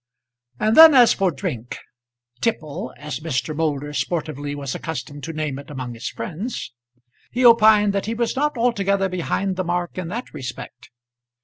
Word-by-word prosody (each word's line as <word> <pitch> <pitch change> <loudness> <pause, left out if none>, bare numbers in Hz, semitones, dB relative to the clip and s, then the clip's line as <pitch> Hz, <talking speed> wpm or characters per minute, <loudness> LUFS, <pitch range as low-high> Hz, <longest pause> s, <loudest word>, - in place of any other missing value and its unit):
And 215 +1 +2
then, 320 -2 +10
as 245 -3 +7
for 195 -1 +1
drink, 140 - -5 0.6
"tipple," 155 - -2
as 150 +1 -6
Mr. 150 -2 -2
Moulder 150 -2 -2
sportively 145 0 -3
was 140 -2 -4
accustomed 145 -3 -6
to 165 - -5
name 155 -4 -3
it 140 - -12
among 130 -4 -6
his 115 - -5
friends, 170 - -6 0.6
he 250 +1 0
opined 215 -3 +6
that 200 0 -2
he 225 - -2
was 235 +2 -1
not 295 0 0
altogether 200 -5 +1
behind 185 +2 -2
the 185 - 0
mark 175 +1 -2
in 180 - -4
that 230 +8 -6
respect. 130 -2 -8
170 Hz, 165 wpm, -22 LUFS, 145-210 Hz, 0.6 s, then